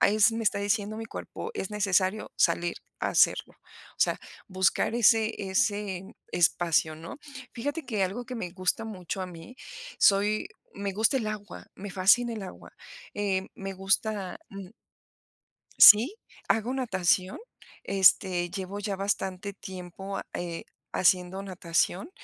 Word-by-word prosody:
ahí 210 +2 +3
sí 225 +2 +5
me 230 - -2
está 205 -2 +1
diciendo 205 +1 -1
mi 225 - -5
cuerpo, 455 - -7
es 195 - -4
necesario 200 0 0
salir 170 0 +1 0.2
a - - -1
hacerlo, - - +3
o - - -20
sea, - - +2 0.3
buscar 190 +2 +1
ese 225 -2 +4 0.2
ese 205 -2 0 0.3
espacio, 165 -2 +2
¿no? 165 - -9 0.3
Fíjate 290 +6 -4
que, 210 -5 -1
algo 200 +7 -2
que 255 - -6
me 185 -7 -4
gusta 185 +4 -1
mucho 190 -3 -5
a - - -4
mí, 175 +6 -11 0.5
soy 210 - +3 0.3
me 200 -1 -3
gusta 225 +7 +2
el 220 - -3
agua, 210 -1 -7
me 200 +1 -7
fascina 230 +6 +4
el 220 -3 -5
agua, 190 - -10 0.4
eh, 195 -2 -1
me 195 0 -6
gusta, 195 0 -1
mm 195 -1 -10 1.1
Sí, 235 - +9 0.3
hago 225 +4 +1
natación, 190 -7 0 0.5
este, 180 -2 +3
llevo 195 +1 -5
ya 205 -1 -3
bastante 195 0 -2
tiempo 190 0 -8
a - - -6
eh, 170 -1 -4 0.3
haciendo 185 +1 +2
natación, 185 - -1
195 Hz, 145 wpm, -28 LUFS, 185-215 Hz, 1.1 s, Sí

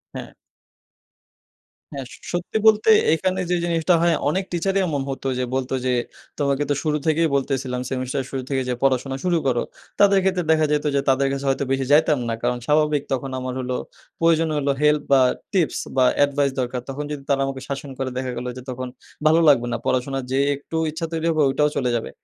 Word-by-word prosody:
হ্যাঁ। - - -7 1.6
হ্যাঁ 135 -2 -5
স - - -11 0.2
সত্যি 175 +5 -2
বলতে 215 0 +5 0.2
এখানে 185 +3 0
যে 180 - +2
জিনিসটা 170 +1 +2
হয় 170 -1 +3
অনেক 190 +5 0
টিচারই 190 +3 0
এমন 145 -3 -1
হতো 135 0 -4
যে 125 - 0
বলতো 135 0 -2
যে, 125 - +2 0.5
"তোমাকে 140 0 +1
তো - - +3
শুরু 150 -1 +1
থেকেই 160 +1 +3
বলতেছিলাম, 130 -2 -1
সেমিস্টারের 130 0 -2
শুরু 135 -1 -3
থেকেই 135 -2 -1
যে 125 - 0
পড়াশোনা 135 0 +1
শুরু 175 -2 +2
করো।" 120 -2 +1 0.4
তাদের 200 -1 +6
ক্ষেত্রে 185 -2 +1
দেখা 155 -1 +4
যেতো 150 0 0
যে 140 - +3
তাদের 135 +1 +3
কাছে 140 0 -3
হয়তো 135 - 0
বেশি 135 0 0
যাইতাম 150 -2 +4
না। - - 0
কারণ 125 0 +1
স্বাভাবিক 150 0 +2
তখন 135 +1 -2
আমার 130 0 -4
হলো 125 0 -2 0.4
প্রয়োজন 165 -1 +3
হলো 140 -1 +1
হেল্প 150 0 +4
বা 135 -1 +6 0.3
টিপস 175 -5 +1 0.2
বা 130 - +5 0.2
এডভাইস 140 -1 0
দরকার; 125 0 -3
তখন 140 +2 -4
যদি 140 -2 -5
তারা 135 -1 +2
আমাকে 135 -1 -5
শাসন 140 +1 -5
করে, 135 -1 -2
দেখা 130 -1 -2
গেলো 125 +1 -4
যে - - -7
তখন 130 0 -4 0.4
ভালো 160 +2 +5
লাগবে 120 -4 +4
না। - - 0
পড়াশোনার 130 +1 -1
যে 135 - +1 0.2
একটু 145 +3 -9 0.2
ইচ্ছা 165 +1 -4
তৈরি 165 0 -2
হবে 155 -1 +1
ওইটাও 150 +2 +2
চলে 125 -2 0
যাবে। 115 - -3
140 Hz, 200 wpm, -22 LUFS, 130-160 Hz, 1.6 s, তাদের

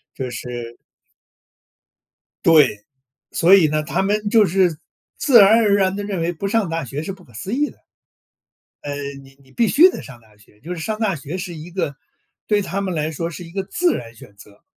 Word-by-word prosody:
就 130 -2 -4
是 120 -1 -7 1.7
对， 140 -11 +4 0.5
所 175 +4 +4
以 170 -5 +5
呢， 155 0 -1
他 155 - -1
们 205 +1 0
就 220 -2 +5
是 180 -3 +1 0.4
自 250 -6 +6
然 210 +3 +7
而 205 -3 +3
然 190 -1 +1
地 205 - -4
认 195 -4 -3
为 170 +1 0
不 185 +4 -4
上 210 -3 0
大 165 -2 -3
学 140 +5 -5
是 195 - -4
不 185 -1 -13
可 120 - -21
思 190 - -6
议 295 +3 +1
的。 - - -18 1.0
呃， 145 -1 -5 0.3
你 135 0 -19
你 130 -1 -23
必 230 -2 +1
须 350 +6 +6
得 - - -6
上 125 -3 -12
大 110 -1 -24
学， 105 0 -24
就 175 +4 -6
是 170 - -7
上 215 +4 -3
大 205 -6 0
学 150 +5 -6
是 180 -1 -6
一 160 +3 -10
个 165 -6 -3 0.5
对 210 -1 +2
他 195 +2 -3
们 190 -2 -3
来 155 0 -2
说 165 +2 -3
是 175 +2 -8
一 165 - -13
个 195 +1 -3
自 345 - 0
然 115 -1 -7
选 100 -2 -15
择， 100 +1 -18
170 Hz, 225 characters per minute, -20 LUFS, 140-200 Hz, 1.7 s, 然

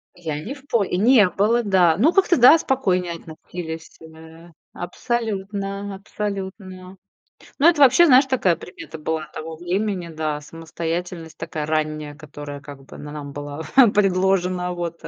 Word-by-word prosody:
Я 160 -4 -5
не 260 - -5
в 285 0 -16
по 230 -3 +2
и 180 - -2
не 220 0 +5
было, 225 +6 +1
да. 180 -6 +3
Ну, 295 - +3
как-то 375 -4 +3
да, 255 +6 +8
спокойнее 185 - 0
относились, 165 0 -9
эмэ, 160 +1 -14 0.2
абсолютно, 200 -1 -4
абсолютно. 190 -2 -6 0.6
Ну, 295 - +4
это 330 -3 +3
вообще, 275 +6 +7
знаешь, 265 -1 +6
такая 195 -11 +1
примета 175 -2 -10
была 155 0 -3
того 160 0 -7
времени. 180 +1 -2
Да, 155 -2 -3
самостоятельность 165 +2 -6
такая 155 -2 -5
ранняя, 155 -1 -2
которая, 145 0 -9
как 140 -1 -12
бы, - - -13
на 145 0 -8
нам 145 -2 -7
была 145 +2 -6 0.3
предложена. 185 -2 +1
Вот. 170 -1 -5
180 Hz, 145 wpm, -22 LUFS, 160-205 Hz, 0.6 s, да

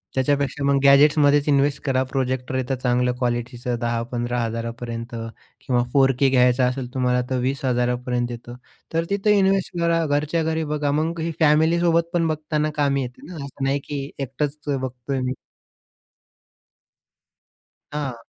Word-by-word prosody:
त्याच्यापेक्षा 140 +1 0
मग 140 0 +3
गॅजेट्समध्येच 145 +1 +5
इन्वेस्ट 140 0 +2
करा. 130 -2 +1
प्रोजेक्टर 130 -1 -2
येतं 130 +1 -1
चांगलं 125 0 +2
क्वालिटीचं 120 0 -2
10,000-15,000 115 -1 -2
पर्यंत 115 0 -5 0.5
किंवा 120 -2 +1
4k 135 -1 +4
घ्यायचं 125 0 +4
असेल 125 -1 -5
तुम्हाला 125 -1 +1
तर 130 - 0
20,000 125 -2 0
पर्यंत 120 -1 -1
येतं. 120 +1 -8 0.4
तर 165 0 +1
तिथे 205 +1 +2
इन्वेस्ट 190 -2 +1
करा. 165 -1 +2
घरच्या 150 +3 0
घरी 160 0 -1
बघा. 145 -1 0
मग 160 +3 -1
ही 165 +1 -1
फॅमिलीसोबत 165 +2 +3
पण 165 -2 +2
बघताना 155 0 -1
कामी 140 -2 +1
येते 125 0 -7
ना, 180 - -9
असं 140 0 -7
नाही 135 +1 +1
की 140 -1 -4
एकटच 140 +2 -3
बघतोय 130 -1 -3
मी. 130 0 -1 2.6
हां. 135 -6 -4
135 Hz, 135 wpm, -23 LUFS, 125-150 Hz, 2.6 s, गॅजेट्समध्येच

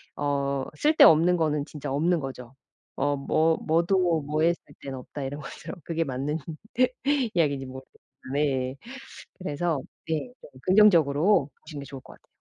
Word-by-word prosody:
어 140 -1 -1
쓸데없는 180 - +6
거는 150 -3 0
진짜 145 -3 -7
없는 165 +4 +2
거죠. 130 -2 -8 0.4
어 145 0 +1
뭐 160 +4 +2
뭐도 170 0 +2
뭐에 155 +4 +1
쓸 - - -15 0.2
때는 135 -1 -6
없다. 135 +3 -8
이런 140 +2 -5
것처럼. 150 +5 -9
그게 165 +1 -1
맞는 140 +3 -3 1.0
이야기인지 140 -5 +1
모르겠 130 +1 -10 0.4
네. 135 -3 0 0.7
그래서 160 -3 -1 0.3
네. 160 +10 -2
좀 - - -14
긍정적으로 175 -4 +4
보시는 150 -2 -8
게 - - -7
좋을 135 0 -9
것 - - -15
같아요. - - -24
150 Hz, 300 characters per minute, -26 LUFS, 140-165 Hz, 1.0 s, 쓸데없는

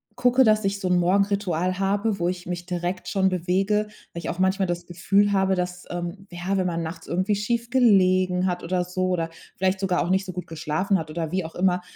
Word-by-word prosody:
gucke, 250 +1 +4
dass 215 -1 +4
ich 200 0 -1
so 185 - -2
'n 180 - +4
Morgenritual 185 -1 +1
habe, 200 +2 0
wo 175 - +1
ich 180 -1 -5
mich 175 0 -4
direkt 180 0 -3
schon 190 -2 +2
bewege. 195 +4 +1 0.3
Weil 170 - -5
ich - - -5
auch 175 - -4
manchmal 190 0 +2
das 175 0 -3
Gefühl 195 +4 +2
habe, 190 -1 +2
dass, 180 0 -3
ähm 175 +3 -5
ja, 175 +3 -2
wenn 185 - +1
man 170 -1 -2
nachts 160 +2 -7
irgendwie 185 +4 0
schief 230 +3 -1
gelegen 185 -7 +4
hat 180 -1 -2
oder 180 +1 0
so 185 +1 -1
oder 170 -3 -1 0.3
vielleicht 190 0 +1
sogar 185 -2 +1
auch - - -4
nicht 190 +1 +2
so 185 - -5
gut 180 0 -6
geschlafen 165 +5 0
hat 160 -2 -5
oder 160 0 -3
wie 185 -1 0
auch 160 - -8
immer. 180 0 +2
185 Hz, 225 wpm, -24 LUFS, 175-195 Hz, 0.3 s, gucke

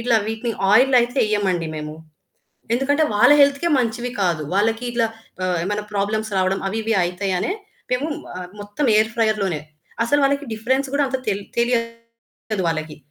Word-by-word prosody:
ఇట్లా 230 -1 +3
వీటిని 225 +2 -2 0.2
ఆయిల్‌లో 255 +4 +6
అయితే 245 +3 -3
ఎయ్యమండి 190 -6 0
మేము. 150 0 -6 0.8
ఎందుకంటే, 285 +4 +2
వాళ్ళ 210 +7 +6
హెల్త్‌కే 280 +4 +2
మంచివి 240 +1 -1
కాదు. 170 -4 0
వాళ్ళకి 225 +4 +1
ఇట్లా 230 -1 +1 0.4
ఆహ్, 180 -1 0
ఏమైనా 205 +1 -2
ప్రాబ్లమ్స్ 215 +2 -1
రావడం 190 +1 +1
అవి, 220 +3 -2
ఇవి 225 - +1
అయితాయనే 185 - -1 0.4
మేము 260 +5 0 0.3
ఆహ్, 180 -1 -7
మొత్తం 205 +8 -2
ఎయిర్ 220 +1 +2
ఫ్రైయర్ 220 -2 +2
లోనే. 170 -6 -1 0.4
అసలు 290 +5 +2
వాళ్ళకి 280 +1 0
డిఫరెన్స్ 260 +5 0
కూడా 285 - +3
అంత 265 - -1
తెల్ 200 0 -1 0.2
తెలియదు 230 -3 -3
వాళ్ళకి. 155 -1 -3
220 Hz, 155 wpm, -21 LUFS, 195-245 Hz, 0.8 s, ఆయిల్‌లో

